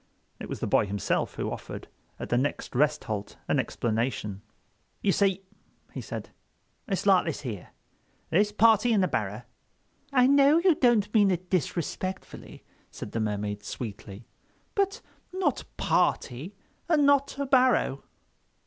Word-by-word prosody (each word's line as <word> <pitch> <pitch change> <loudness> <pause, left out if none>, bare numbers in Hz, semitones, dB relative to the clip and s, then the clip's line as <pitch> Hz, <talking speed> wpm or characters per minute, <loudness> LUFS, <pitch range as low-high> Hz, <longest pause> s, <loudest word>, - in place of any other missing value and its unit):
It - - -7
was - - -5
the - - 0
boy 105 - +2
himself 100 -1 -1
who - - -3
offered, - - -7 0.3
at - - -6
the - - +1
next 145 +3 -3
rest 150 +3 +2
halt, 105 -4 -5
an - - +2
explanation. 110 -3 -2 0.6
"You 200 - +3
see," 195 -1 +1 0.5
he - - -5
said, - - -7 0.6
"it's 195 -2 -2
like 195 -2 +5
this 160 -3 -3
here. 110 -10 -6 0.6
This 205 +5 +3
party 225 +2 +4
in 205 - +3
the 185 - +3
barrow—" 110 - -3 0.7
"I 250 -2 +5
know 280 +3 +5
you 350 +1 +4
don't 235 -7 +2
mean 205 -3 +5
it 180 -1 -2
disrespectfully," 185 +2 -3 0.3
said - - -8
the 115 - -2
Mermaid, 105 -1 -2
sweetly; 105 -1 -7 0.5
"but 395 0 0 0.3
not 375 +1 -1
party—and 195 - 0
not 280 -1 +3
a 280 - -1
barrow." 255 - +3
185 Hz, 140 wpm, -27 LUFS, -, 0.7 s, like